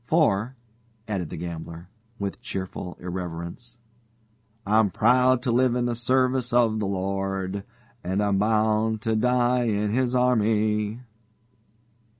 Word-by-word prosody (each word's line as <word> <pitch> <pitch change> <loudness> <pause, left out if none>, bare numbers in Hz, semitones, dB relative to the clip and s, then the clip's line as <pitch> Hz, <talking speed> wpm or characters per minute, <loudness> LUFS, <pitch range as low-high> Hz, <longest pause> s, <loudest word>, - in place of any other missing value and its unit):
For," 125 -7 +2 0.5
added 95 -7 -3
the - - -6
gambler, 85 0 -7 0.3
with 100 -2 -4
cheerful 95 -1 -6
irrelevance, 90 +6 -6 0.9
"'I'm 105 0 +3
proud 125 +4 +3
to 125 - 0
live 125 0 +3
in 125 -1 0
the 120 - 0
service 130 +1 +1
of 115 -3 +3
the 105 - -1
Lord, 95 0 -2 0.4
And 95 +2 -1
I'm 100 -1 +1
bound 110 +1 +1
to 110 0 0
die 125 +1 +2
in 105 -2 0
His 125 +1 +1
army.'" 110 -2 +1
110 Hz, 125 wpm, -25 LUFS, 95-120 Hz, 0.9 s, I'm